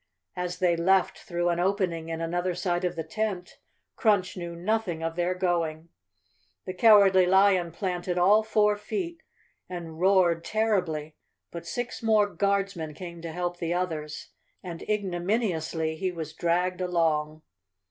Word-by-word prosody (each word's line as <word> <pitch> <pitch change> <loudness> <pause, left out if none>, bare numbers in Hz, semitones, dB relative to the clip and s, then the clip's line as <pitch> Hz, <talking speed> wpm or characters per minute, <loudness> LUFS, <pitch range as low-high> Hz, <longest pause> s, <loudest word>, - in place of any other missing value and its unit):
As 180 0 -3
they 180 -2 +2
left 185 +2 +2
through 175 -3 -2
an 170 0 0
opening 180 -3 0
in 165 0 -4
another 175 +2 -1
side 175 0 -1
of 180 -1 -1
the 165 - -3
tent, 195 -1 -4 0.4
Crunch 205 -6 +2
knew 170 -2 -6
nothing 180 -2 -1
of 165 0 -2
their 175 +1 0
going. 170 -3 -1 0.8
The 185 - -4
Cowardly 195 -3 +6
Lion 190 -2 +4
planted 180 0 -3
all 200 +5 +5
four 210 -1 +2
feet 335 - -4 0.5
and 170 -3 -7
roared 180 -3 +3
terribly 175 -9 -1 0.3
but 170 0 -8
six 245 +4 -4
more 220 -2 +4
Guardsmen 195 -6 -1
came 170 -1 -8
to 165 -1 -6
help 175 +1 -3
the 170 0 -2
others 155 -4 -4 0.3
and 170 -3 -7
ignominiously 175 -5 -1
he 185 +2 -1
was 160 -3 -6
dragged 180 +2 0
along. 160 -3 0
180 Hz, 145 wpm, -27 LUFS, 170-195 Hz, 0.8 s, Cowardly